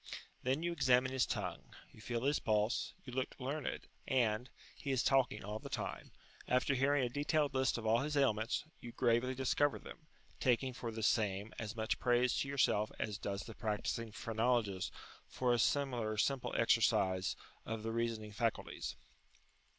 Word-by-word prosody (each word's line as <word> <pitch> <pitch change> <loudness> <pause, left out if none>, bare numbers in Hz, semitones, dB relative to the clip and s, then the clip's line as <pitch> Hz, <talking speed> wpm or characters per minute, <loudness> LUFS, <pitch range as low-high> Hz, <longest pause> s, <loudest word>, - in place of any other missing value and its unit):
Then 135 +5 0
you 175 - 0
examine 130 -5 +3
his 130 -1 +2
tongue, - - -4 0.2
you - - -15
feel 120 +1 -2
his 145 +2 +2
pulse, 110 0 0
you 125 - -8
look 130 0 -2
learned, 140 +3 -3 0.2
and 120 -2 +1 0.3
he 140 - -6
is 130 -3 +2
talking 130 -6 +2
all 105 +1 -4
the - - -8
time - - -4 0.4
after 125 +2 +2
hearing 135 +1 +3
a - - +2
detailed 145 +3 +1
list 130 -2 +2
of 115 - -5
all 110 +2 +4
his 150 +2 -1
ailments, 115 -1 +1
you 120 -1 -9
gravely 125 +1 +2
discover 135 +2 +2
them, 155 - -12 0.3
taking 130 0 +2
for 120 -1 -5
the 110 0 -5
same 105 -2 +1
as 110 0 -4
much 110 -1 -1
praise 125 0 +3
to - - 0
yourself 120 -6 +2
as 105 -2 -3
does 100 -1 -3
the 115 - -9
practising 110 +1 -2
phrenologist 110 -3 0 0.4
for 125 -1 +1
a 120 - +2
similar 120 -5 +1
simple 135 +4 +1
exercise 95 0 +3 0.3
of 110 -1 -4
the 115 - -2
reasoning 115 -2 -2
faculties. 115 +2 -2
120 Hz, 165 wpm, -36 LUFS, 110-130 Hz, 0.4 s, all